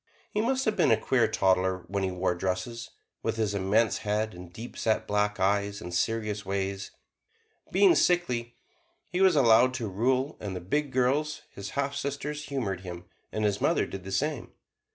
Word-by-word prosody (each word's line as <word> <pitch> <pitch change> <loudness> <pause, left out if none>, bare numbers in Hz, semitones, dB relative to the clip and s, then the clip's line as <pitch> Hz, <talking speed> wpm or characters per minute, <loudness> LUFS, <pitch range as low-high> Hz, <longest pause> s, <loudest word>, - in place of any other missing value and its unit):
He 210 - 0
must 260 +3 0
have 220 - +1
been 185 - +3
a 110 - +5
queer 120 0 +2
toddler 95 -2 +1
when 100 +2 -2
he 95 - 0
wore 90 0 0
dresses, 95 +7 -3 0.3
with - - -1
his 110 -2 0
immense 100 +3 +2
head 110 +1 -1
and 90 -1 -11
deep 115 +7 -9
set 110 -1 0
black 105 0 0
eyes 100 +1 +1
and 90 - -7
serious 105 +2 -1
ways. 95 0 -3 0.8
Being 385 -3 +6
sickly, 125 - +1 0.6
he 180 +1 0
was 190 -3 +6
allowed 125 -1 +5
to 120 -4 -3
rule, 130 +8 0
and 100 -3 -5
the - - -3
big 140 +11 -1
girls, 135 +5 +1
his 100 0 -7
half 140 0 0
sisters, 140 +2 -3
humored 120 -10 -2
him, 90 -2 -8 0.3
and 110 0 -1
his 100 -2 0
mother - - +2
did 95 -1 -7
the 95 - -7
same. 145 +4 -2
110 Hz, 180 wpm, -28 LUFS, 95-135 Hz, 0.8 s, Being